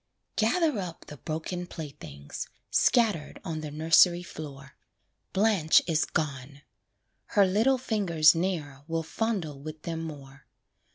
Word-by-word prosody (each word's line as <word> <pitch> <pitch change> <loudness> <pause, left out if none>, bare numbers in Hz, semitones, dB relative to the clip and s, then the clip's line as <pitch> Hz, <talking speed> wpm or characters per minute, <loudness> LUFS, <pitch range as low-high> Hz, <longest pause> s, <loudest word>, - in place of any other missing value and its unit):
Gather 260 - +2
up 175 -4 -6
the 150 - -10
broken 165 +4 -4
playthings, 85 - -8 0.2
Scattered 215 -11 +2
on 160 -3 -3
the 155 - -5
nursery 165 +3 +4
floor; 140 -4 -9 0.6
Blanche 195 -6 +4
is 160 -2 +1
gone! 140 -2 -4 0.7
her 200 - +7
little 220 +8 +3
fingers 190 -11 +4
Ne'er 165 -6 -2
will 165 0 -1
fondle 165 -6 -2
with 155 +1 -8
them 165 -1 -3
more. 140 -4 -9
160 Hz, 120 wpm, -28 LUFS, 150-190 Hz, 0.7 s, her